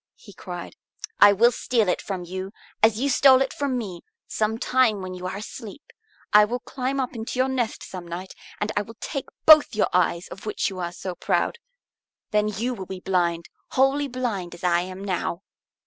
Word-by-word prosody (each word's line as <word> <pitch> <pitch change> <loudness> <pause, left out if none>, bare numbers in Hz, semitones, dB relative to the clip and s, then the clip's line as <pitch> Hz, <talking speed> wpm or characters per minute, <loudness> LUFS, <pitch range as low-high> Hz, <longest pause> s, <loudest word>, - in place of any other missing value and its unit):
he 485 - -15
cried. - - -8 0.4
"I 205 - +9
will 230 +5 +5
steal 230 -3 0
it 180 - 0
from 190 -3 -4
you, 185 +2 -6 0.3
as 220 0 +4
you 275 - +1
stole 265 -1 +6
it 265 0 0
from 280 -3 -1
me, 190 -7 -5 0.3
some 220 +1 -1
time 230 -5 +2
when 185 0 -5
you 180 0 -5
are 190 - -4
asleep. 225 - -9 0.4
I 210 0 +9
will 240 +4 -1
climb 270 +1 -3
up 260 -1 -2
into 230 +1 -5
your 260 +1 +3
nest 250 -4 -2
some 180 -2 -8
night, 180 +3 -6 0.3
and 210 - -1
I 205 - +2
will 225 +2 -10
take 275 -4 -4 0.2
both 310 -7 +8
your 215 - +2
eyes 175 -1 +1
of 200 - -10
which 210 - -1
you 185 - -7
are 175 -1 -3
so 180 +1 -6
proud. 470 - -1 0.7
Then 210 0 +2
you 220 +5 -2
will 190 -5 -7
be 190 -1 -6
blind, 170 -3 0 0.3
wholly 270 +2 +3
blind 230 -9 -3
as 170 - -16
I 175 -1 +3
am 185 +2 -7
now." 185 -1 -2
210 Hz, 200 wpm, -24 LUFS, 185-255 Hz, 0.7 s, I